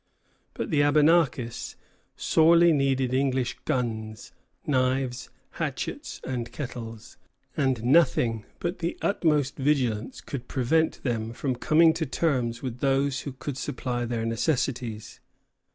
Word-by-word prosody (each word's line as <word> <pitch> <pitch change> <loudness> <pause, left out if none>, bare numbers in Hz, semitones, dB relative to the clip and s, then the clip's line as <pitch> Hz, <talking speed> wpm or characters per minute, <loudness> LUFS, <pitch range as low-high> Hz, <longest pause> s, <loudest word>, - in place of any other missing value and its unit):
But - - -4
the 150 - +2
Abenakis 145 -4 +2 0.4
sorely 170 +1 +5
needed 135 -3 +1
English 130 -2 0
guns, 110 -4 -3 0.3
knives, 130 -2 0 0.3
hatchets, - - -4
and 120 -2 -4
kettles, 115 -5 -7 0.4
and 130 -5 0
nothing 125 -5 +3
but 175 +2 -3
the 170 0 -2
utmost 150 -8 +1
vigilance 130 -5 0
could 130 -1 -7
prevent 160 +5 +1
them 115 -3 -2
from 130 +1 -2
coming 160 +6 +4
to 160 -2 -2
terms 125 -5 -1
with 125 -2 -4
those 135 0 +1
who 140 - -6
could 135 +1 -6
supply 125 -2 -3
their 115 -1 -2
necessities. 120 -2 -2
130 Hz, 120 wpm, -26 LUFS, 120-145 Hz, 0.4 s, sorely